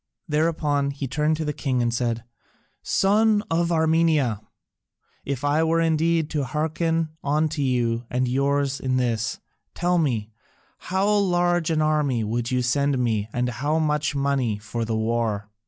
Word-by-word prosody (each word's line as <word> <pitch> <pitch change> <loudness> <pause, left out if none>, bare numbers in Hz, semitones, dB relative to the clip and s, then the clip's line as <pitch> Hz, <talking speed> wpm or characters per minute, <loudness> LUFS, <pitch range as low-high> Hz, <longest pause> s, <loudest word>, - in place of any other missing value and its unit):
Thereupon 150 -2 +1
he 140 0 -4
turned 150 +4 0
to 160 - -3
the 150 - -1
king 135 -3 -1
and 120 -1 +1
said, 115 -1 -1 0.6
"Son 210 +2 +2
of 170 +1 +1
Armenia, 160 -8 +2 0.8
if 140 -2 -3
I 145 +2 +2
were 165 +1 +2
indeed 165 0 +2
to 150 -3 0
hearken 160 +3 -1
unto 150 +1 0
you 120 -3 0
and 125 0 0
yours 140 +2 0
in 130 -1 0
this, 115 -3 -1 0.4
tell 175 0 +1
me, 115 -9 -1 0.5
how 190 +2 -1
large 175 -5 +2
an 155 -1 +1
army 150 -6 +1
would 115 +2 -2
you 125 -1 0
send 140 +2 +1
me 110 -4 0
and 125 +2 -1
how 145 +6 -1
much 150 -2 0
money 140 -6 0
for 110 +2 -4
the 110 0 -1
war?" 110 -2 -1
145 Hz, 155 wpm, -24 LUFS, 120-160 Hz, 0.8 s, Son